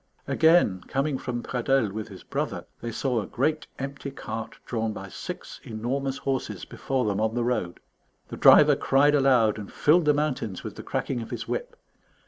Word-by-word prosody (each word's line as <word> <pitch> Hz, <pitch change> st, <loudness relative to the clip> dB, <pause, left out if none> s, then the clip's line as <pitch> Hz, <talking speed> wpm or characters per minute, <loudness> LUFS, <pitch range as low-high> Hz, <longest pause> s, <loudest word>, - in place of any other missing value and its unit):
Again, 160 Hz, -, +4 dB
coming 135 Hz, 0 st, -1 dB
from 120 Hz, -1 st, -4 dB
Pradelles 125 Hz, -3 st, +1 dB
with 110 Hz, +2 st, -5 dB
his 95 Hz, -4 st, -11 dB
brother, -, -, -3 dB, 0.2 s
they 120 Hz, -, -4 dB
saw 120 Hz, 0 st, 0 dB
a -, -, -7 dB
great 150 Hz, +4 st, -1 dB
empty 140 Hz, +1 st, -5 dB
cart 110 Hz, -4 st, -6 dB
drawn 110 Hz, -2 st, -2 dB
by 95 Hz, -1 st, -8 dB
six -, -, -7 dB
enormous 130 Hz, +5 st, -3 dB
horses 135 Hz, -2 st, -3 dB
before 130 Hz, -2 st, -2 dB
them 105 Hz, 0 st, 0 dB
on 110 Hz, +1 st, 0 dB
the 120 Hz, -, +1 dB
road. 115 Hz, -8 st, -1 dB, 0.5 s
The -, -, -6 dB
driver -, -, +7 dB
cried 145 Hz, +2 st, +3 dB
aloud 130 Hz, -7 st, +4 dB
and 105 Hz, -, -8 dB
filled 160 Hz, +3 st, +3 dB
the 150 Hz, -1 st, +4 dB
mountains 130 Hz, -10 st, -2 dB
with -, -, -6 dB
the -, -, -7 dB
cracking 125 Hz, -3 st, -2 dB
of 115 Hz, -, -7 dB
his -, -, -5 dB
whip. -, -, -3 dB
125 Hz, 180 wpm, -26 LUFS, 110-140 Hz, 0.5 s, driver